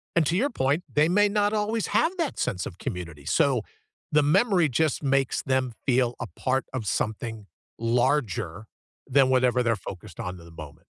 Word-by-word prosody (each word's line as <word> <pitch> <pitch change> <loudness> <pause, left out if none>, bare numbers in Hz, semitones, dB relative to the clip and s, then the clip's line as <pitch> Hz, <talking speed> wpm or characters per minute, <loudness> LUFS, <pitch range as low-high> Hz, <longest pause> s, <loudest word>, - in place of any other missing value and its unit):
and 165 -3 +4
to 165 - +1
your 270 +9 +2
point, 145 - 0
they 150 +2 +3
may 205 +2 +4
not 205 0 +1
always 215 +1 0
have 345 +4 +2
that 325 -5 -2
sense 90 -2 -1
of 90 - -8
community, 85 - -6
so, - - +2 0.5
the 150 -1 +3
memory 175 - +3
just 155 +3 0
makes 135 -1 +1
them 130 -3 0
feel 125 -2 +2
a 120 - -3
part 130 +5 -1
of 120 -5 -3
something 110 0 -2 0.3
larger 115 - 0 0.4
than 135 -1 +4
whatever 125 -1 +3
they're 115 -2 +2
focused 90 -4 -9
on 90 0 -5
in 85 - -14
the 85 - -14
moment. 75 0 -11
130 Hz, 180 wpm, -26 LUFS, 110-160 Hz, 0.5 s, and